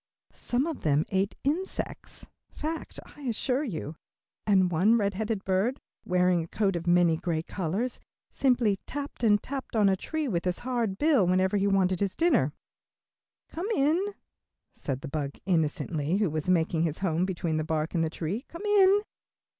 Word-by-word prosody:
Some 250 +3 -1
of 325 -3 -4
them 150 0 +2
ate 195 +1 0
insects 335 +8 -3 0.2
fact, 320 +2 -5 0.2
I 295 - -14
assure 255 +2 0
you 165 - -4 0.5
and 190 -3 +4
one 200 +8 +4
red 200 -2 0
headed 215 0 -3
bird, 195 +8 +1 0.3
wearing 180 -1 +3
a - - -9
coat 195 +1 0
of 170 0 -4
many 175 -2 +4
gay 160 -1 -2
colors, 195 +9 -3 0.3
simply 240 -7 +2
tapped 285 -3 -6
and 210 -2 +4
tapped 270 -3 -6
on 210 -3 +5
a 190 - +3
tree 310 +9 -3
with 175 -7 -1
his 180 -1 0
hard 235 -6 -1
bill 285 - +3
whenever 185 +2 +2
he 200 0 +2
wanted 190 -2 +2
his 200 -2 -1
dinner. 275 - +3 1.0
"Come 355 +6 -4
in," 305 +7 +2 0.7
said 135 -2 -4
the 150 - -6
bug, 140 -1 -4
innocently, 160 -1 0
who 205 -6 +1
was 155 +3 -2
making 165 -2 +2
his 165 -2 0
home 165 -1 +1
between 170 -4 -1
the 155 - 0
bark 155 0 -2
and 165 -2 +1
the 160 - 0
tree, 175 +9 -3
"come 340 +5 -8
in." 405 -1 +5
195 Hz, 170 wpm, -28 LUFS, 170-250 Hz, 1.0 s, on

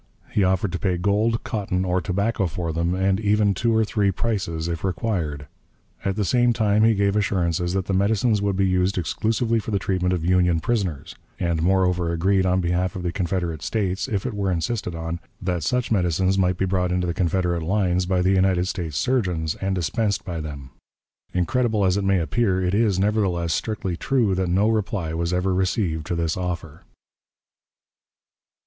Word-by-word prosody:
He 105 - +2
offered 95 0 +1
to 90 - -3
pay 90 -3 0
gold, 105 +5 +1
cotton, 95 -4 -2
or 90 0 +1
tobacco 100 +2 0
for 85 0 -3
them, 85 +2 0
and 95 +1 +1
even 105 -1 +2
two 115 +4 +1
or 110 - +3
three 105 -2 +1
prices 95 -6 -2
if 85 -1 -4
required. 85 -7 -2 0.6
At 95 -1 -1
the 105 -1 0
same 120 +6 +3
time 110 -2 +2
he 110 0 +4
gave 100 0 +1
assurances 90 -4 0
that 95 -1 -1
the 95 - -2
medicines 105 +2 +2
would 100 -1 0
be 95 +1 +2
used 90 +1 +1
exclusively 115 +6 0
for 110 - -6
the 100 - +1
treatment 90 -1 0
of 85 -3 -1
Union 90 -2 +3
prisoners; 90 -7 -2 0.3
and 85 -2 0
moreover 90 -1 +2
agreed, 95 +3 +2
on 90 +1 +2
behalf 90 +1 0
of 90 - -5
the 90 - -1
Confederate 85 -4 -2
States, 95 -2 -1
if 105 -5 -2
it 125 - -2
were 100 -2 -1
insisted 90 +1 -2
on, 80 +1 -4 0.2
that 90 -3 -2
such 125 +10 -1
medicines 95 -1 +2
might 90 -2 +1
be 95 - +1
brought 90 -1 0
into 90 0 0
the 85 - -1
Confederate 90 -1 0
lines 90 0 +1
by 90 -1 +1
the 95 - +3
United 95 -1 +2
States 80 -6 -3
surgeons, 90 -12 0
and 95 0 0
dispensed 100 +3 -1
by 85 -3 -4
them. 70 -4 -8 0.6
Incredible 110 +3 +1
as 90 0 +3
it 100 - 0
may 95 0 +3
appear, 90 +5 +1
it 90 0 0
is, 105 -3 +2
nevertheless, 95 -5 +1
strictly 95 -5 -2
true 115 0 +1
that 95 -1 0
no 95 +4 +3
reply 105 -7 -1
was 85 +1 -1
ever 90 +1 +1
received 90 -4 -1
to 85 - -1
this 85 -1 -1
offer. 90 -4 -5
95 Hz, 190 wpm, -23 LUFS, 85-100 Hz, 0.6 s, he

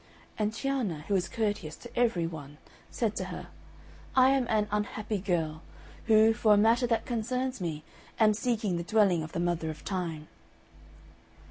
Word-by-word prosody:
And 210 0 0
Cianna, 230 - -2
who - - 0
was 185 -3 +1
courteous 205 -8 -2
to 240 - -13
every 230 -8 +2
one, 150 -3 -7 0.3
said 220 -3 -1
to - - -2
her, - - -7 0.7
"I 260 0 +6
am 270 -3 +2
an 210 -1 +2
unhappy 210 0 -2
girl, 165 -5 -1 0.5
who, 220 0 +6
for 215 -1 +4
a - - +3
matter 230 +4 +4
that 230 -1 0
concerns 250 +1 -2
me, 160 -3 -3 0.4
am 215 -1 +5
seeking 215 -5 -1
the 170 - -3
dwelling 195 -3 +3
of 155 0 -7
the - - -2
Mother 170 -2 0
of 155 -1 -8
Time." 165 -5 -3
210 Hz, 165 wpm, -29 LUFS, 170-230 Hz, 0.7 s, I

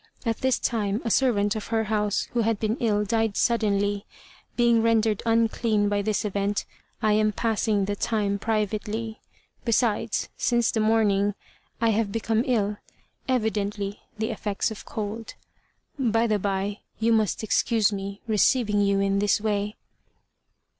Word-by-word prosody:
At 225 -1 0
this 260 -1 +1
time 210 -3 -1
a 230 - 0
servant 210 -5 +2
of 215 - -5
her 225 -1 +1
house, 210 -1 0
who 240 - 0
had 225 -2 0
been 220 0 0
ill, 210 -3 +1
died 225 0 0
suddenly. 205 -3 +1 0.5
Being 235 -1 +4
rendered 225 -2 +2
'unclean' 225 -2 +2
by 205 0 +1
this 215 +1 -1
event, 200 0 -1 0.4
I 215 -1 +4
am 215 0 +3
passing 215 -2 0
the 205 +1 -2
time 205 -2 -1
privately. 220 +1 -2 0.4
Besides, 230 -2 0
since 240 -2 +1
the 225 - -1
morning, 205 -2 +2 0.4
I 230 0 +3
have 215 -1 +1
become 225 +1 0
ill, 210 -4 +1 0.5
evidently 210 -4 -1 0.2
the 220 +2 -1
effects 210 -1 -2
of 220 - -8
cold. 215 +1 -5 0.6
By 230 -3 +2
the 215 -2 +1
bye, 200 +1 -2 0.2
you 230 +1 +2
must 220 -1 +1
excuse 220 0 +2
me 200 0 -5
receiving 215 0 +3
you 200 -1 +2
in 195 0 +1
this 205 +1 +2
way." 210 -1 -1
215 Hz, 145 wpm, -25 LUFS, 205-225 Hz, 0.6 s, Being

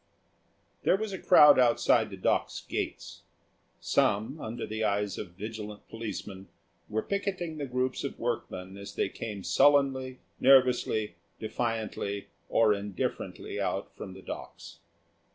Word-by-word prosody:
There 190 - +3
was 215 -1 -4
a 190 - -4
crowd 150 -6 +8
outside 120 -2 +4
the 95 - -8
Docks 95 - 0
gates. - - -4 0.6
Some, 110 +9 +1
under 115 +2 -4
the 110 +1 -3
eyes 105 -1 0
of 85 - -7
vigilant 105 0 -7
policemen, 105 -3 -6 0.4
were 110 +1 -1
picketing 185 -5 -3
the 140 - -3
groups 125 +1 -1
of - - -4
workmen 95 +1 -4
as 100 0 -9
they - - 0
came 105 -4 -6
sullenly, 135 -1 +3 0.2
nervously, 125 -7 +4 0.2
defiantly, 110 -3 -3 0.2
or 110 -2 +4
indifferently 100 -2 -4
out - - -2
from 95 - -8
the 95 - -12
Docks. - - -8
110 Hz, 130 wpm, -29 LUFS, 100-130 Hz, 0.6 s, crowd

